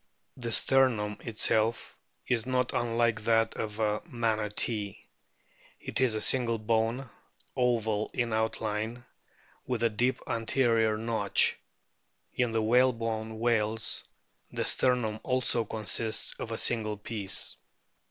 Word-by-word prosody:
The 120 -2 -4
sternum 115 -6 +2
itself 110 0 0 0.3
is 120 -1 0
not 125 -1 0
unlike 115 -1 +1
that 115 0 +2
of 110 0 -4
a 105 -1 0
Manatee; 110 - -1 0.8
it - - -2
is 125 -4 +3
a 110 - -2
single 120 -3 +2
bone, 115 +4 0 0.5
oval 110 -4 +1
in 120 -2 -1
outline, 110 +1 -2 0.6
with 125 -2 -1
a 115 - +4
deep 125 +4 0
anterior 115 -2 +2
notch. 115 0 +2 0.8
In 125 -2 0
the 115 -1 0
whalebone 115 -2 +1
whales 110 -2 +1 0.5
the - - -2
sternum 120 -4 +2
also 125 -3 +1
consists 110 +1 0
of 115 - -5
a 115 - -2
single 110 -3 +1
piece. 105 -2 -2
115 Hz, 115 wpm, -29 LUFS, 110-120 Hz, 0.8 s, a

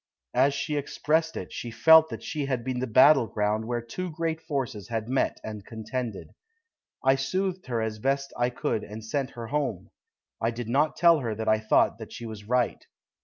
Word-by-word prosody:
As 135 +3 +3
she 150 +1 -2
expressed 160 +3 0
it, 90 - -6
she 120 - -5
felt 160 +7 +6
that - - -7
she 150 -3 -3
had 130 -4 -1
been 130 0 -2
the 130 - -2
battle 130 +2 +6
ground 105 +1 -1
where 120 -1 -2
two 180 +10 -5
great 165 0 -2
forces 130 - -3
had 115 -1 -3
met 130 +2 0
and 105 -2 -6
contended. 110 0 -5 0.8
I 135 - +6
soothed 185 +7 -2
her 115 -3 -1
as 110 -1 -3
best 135 +3 -1
I 120 0 +1
could 115 -3 -2
and 110 +1 -8
sent 135 +3 -1
her 115 - -5
home. 135 -10 -2 0.5
I 115 - +2
did 120 0 -5
not 145 +6 +2
tell 170 -2 +6
her 115 -5 -3
that 110 +1 -4
I 110 0 +4
thought 110 - +2
that - - -9
she 120 - -7
was 110 -2 -8
right. 125 +1 0
125 Hz, 200 wpm, -27 LUFS, 110-145 Hz, 0.8 s, felt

